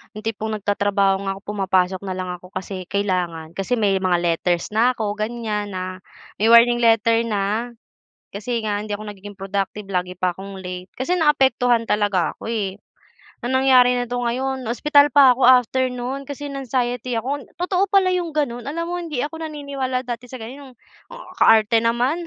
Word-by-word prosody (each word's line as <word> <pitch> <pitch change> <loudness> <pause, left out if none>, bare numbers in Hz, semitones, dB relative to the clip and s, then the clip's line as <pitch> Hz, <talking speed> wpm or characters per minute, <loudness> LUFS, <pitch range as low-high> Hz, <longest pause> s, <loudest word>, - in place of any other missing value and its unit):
Yung 215 - -8
tipong 220 0 -3
nagtatrabaho 200 -1 +1
nga 195 - -1
ako, 195 - -12
pumapasok 190 -2 +1
nalang 185 -1 -4
ako 180 - -14
kasi 185 -1 -5
kailangan. 180 -5 -2
Kasi 195 +8 -2
may 200 -4 +1
mga 185 -2 +2
letters 170 +1 0
na 235 +4 +3
ako, 210 -3 -2
ganiyan, 215 -2 -3
na 185 0 -5 0.4
may 215 - +3
warning 240 +1 +7
letter 230 0 +4
na. 215 +3 -1 0.6
Kasi 230 +4 -2
nga 205 -1 -1
hindi 215 - -9
ako 215 - -8
nagiging 205 0 -10
productive, 195 +1 -3
lagi 180 -1 -2
pa 180 -1 0
akong 195 +1 -9
late. 180 0 -7
Kasi 265 +8 0
naapektuhan 265 -7 +3
talaga 205 -4 +1
ako - - -7
eh. 200 -4 -2 0.7
Ang 250 +2 -2
nangyari 255 -2 +5
na 245 0 -1
'to 245 - -1
ngayon, 260 +2 -2
ospital 285 +5 +4
pa 275 -3 +8
ako 260 - +2
after 255 +1 +4
no'n, 250 +3 -5
kasi 285 +1 -6
na 275 0 -5
anxiety 245 0 -1
ako. 265 +5 -3
Totoo 365 +2 0
pala 385 -2 +4
yung 350 -3 -2
gano'n. 245 -5 -2
Alam 330 +4 -3
mo - - -2
hindi 310 -7 -3
ako 310 +2 -5
naniniwala 280 -4 -3
dati 245 0 -6
sa 245 -2 -9
ganun, 260 +2 -10 0.6
kaarte 225 +1 +5
naman, 250 +9 0
230 Hz, 175 wpm, -21 LUFS, 195-260 Hz, 0.7 s, pa